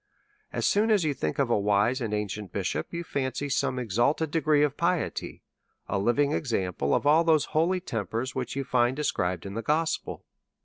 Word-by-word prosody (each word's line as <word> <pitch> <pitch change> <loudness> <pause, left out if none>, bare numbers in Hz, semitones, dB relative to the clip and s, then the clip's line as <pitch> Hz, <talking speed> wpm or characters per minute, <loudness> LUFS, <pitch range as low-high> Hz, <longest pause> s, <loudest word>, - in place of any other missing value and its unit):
As - - -2
soon 215 +3 +3
as 205 -6 +3
yon 150 - +1
think 80 - -3
of 135 -4 +1
a 110 - +3
wise 105 +6 +2
and 115 -3 -2
ancient 105 -2 -3
bishop, 95 -3 -2
you 170 0 -4
fancy 140 -2 -3
some 130 -1 0
exalted 125 - 0
degree 155 -2 +3
of 145 -1 0
piety, 170 +1 -2 0.4
a 100 - -1
living 140 +8 +2
example 95 - 0
of - - -1
all 155 +3 +5
those 160 -3 +3
holy 170 +4 +2
tempers 115 - -3
which 130 -1 -4
you 140 - -1
find 125 -1 +2
described 90 - -1
in 100 - -6
the 115 - -3
gospel. 160 +5 -1
130 Hz, 185 wpm, -27 LUFS, 105-155 Hz, 0.4 s, all